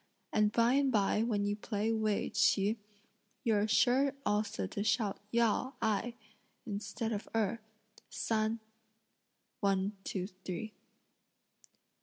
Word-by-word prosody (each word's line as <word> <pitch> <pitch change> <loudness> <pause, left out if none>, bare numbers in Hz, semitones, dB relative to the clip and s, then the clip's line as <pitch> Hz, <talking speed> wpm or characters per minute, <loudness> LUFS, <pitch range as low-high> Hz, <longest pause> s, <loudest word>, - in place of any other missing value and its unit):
And 210 -1 +3
by 235 +2 +4
and 275 -1 +3
by 210 -1 +2
when 215 -3 +1
you 205 0 0
play 215 +1 -1
'Wei 215 -2 0
Ch'i' 205 +2 +3 0.7
you're 215 -4 +2
sure 265 +5 +3
also 205 - 0
to 200 - -3
shout 215 -2 +1
out - - -32
yao, 235 +3 +2
ai, 225 +2 0 0.5
(instead 215 +2 -3
of 210 -1 -4
erh), 225 +1 +1 0.5
san; 220 0 0 1.0
(one, 200 0 +1
two, 185 -2 -3
three)." 185 +2 -6
215 Hz, 120 wpm, -33 LUFS, 205-230 Hz, 1.0 s, by